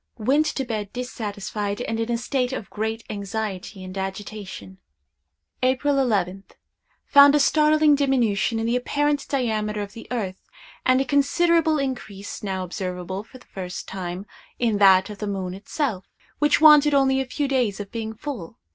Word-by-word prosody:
Went 275 +7 +2
to 270 - -2
bed 215 -4 -4
dissatisfied, 205 -4 -4
and 225 -2 -2
in 225 +1 -1
a 235 - +1
state 250 +1 -1
of 225 - -6
great 220 +1 -3
anxiety 200 -1 -5
and 185 +1 -8
agitation. 190 - -6 0.8
"April 260 +3 +2
11th. 195 -7 -1 0.5
Found 285 0 +7
a - - +4
startling 305 +1 +4
diminution 245 -6 +1
in 225 - -1
the 235 +2 +1
apparent 290 +3 0
diameter 215 -5 -1
of 200 - -9
the 230 - -10
earth, 200 -7 -3 0.5
and 255 +1 +4
a - - -1
considerable 315 +4 +3
increase, 245 -8 -5
now 190 -2 -3
observable 180 +1 -5
for 230 - -14
the - - -20
first 180 -2 -7
time, 185 0 -5 0.3
in 225 -4 +1
that 190 0 +6
of 205 - -10
the 210 - -3
moon 190 -2 -3
itself, 200 0 -3 0.3
which 295 0 +3
wanted 300 -2 +7
only 265 -1 +3
a - - -3
few 285 +2 -2
days 250 -7 0
of 200 -1 -7
being 220 -1 -5
full. 230 - -7
225 Hz, 165 wpm, -24 LUFS, 200-270 Hz, 0.8 s, Found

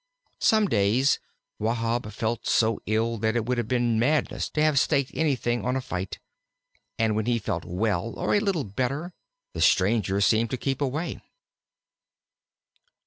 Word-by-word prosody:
Some 215 -2 +4
days 115 - +2 0.4
Wahb 115 0 -1
felt 110 +2 -3
so 110 -1 +2
ill 110 +1 0
that 110 +2 0
it 115 -2 0
would 125 0 0
have 120 - -2
been 120 -2 +1
madness 145 +6 0
to 150 - -1
have 155 -3 +4
staked 140 -2 +1
everything 125 -6 0
on 125 +1 0
a - - +1
fight, 95 -6 -5 0.8
and 110 -2 +1
when 110 +1 -1
he 120 -1 +2
felt 100 -6 -3
well 100 +3 -1
or - - 0
a 205 - +4
little 195 -7 0
better, 135 - -3 0.4
the - - -4
stranger 100 0 +3
seemed 110 +3 +3
to 130 - -2
keep 135 +2 -2
away. 145 +5 -2
115 Hz, 155 wpm, -26 LUFS, 110-135 Hz, 0.8 s, Some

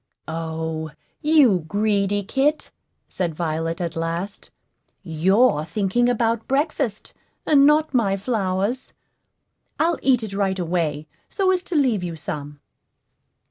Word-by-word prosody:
"O, 160 0 -4 0.3
you 295 - +5
greedy 205 +1 +1
kit!" 275 +8 0 0.4
said 170 -4 -3
Violet, 165 +1 -2
at 170 -2 -3
last; 170 +5 -4 0.5
"you're 185 +2 +2
thinking 200 +8 0
about 230 -1 0
breakfast, 275 -6 -1 0.3
and 285 -2 +5
not 305 0 +3
my 200 -6 +2
flowers. 200 +2 -2 0.9
I'll 335 0 +1
eat 255 -4 +3
it 210 -2 -6
right 195 -1 0
away, 165 -4 -1 0.2
so 385 -2 +1
as 365 -1 +1
to 355 - -5
leave 250 -10 +2
you 170 -2 -4
some." 145 -1 -6
200 Hz, 120 wpm, -22 LUFS, 165-255 Hz, 0.9 s, you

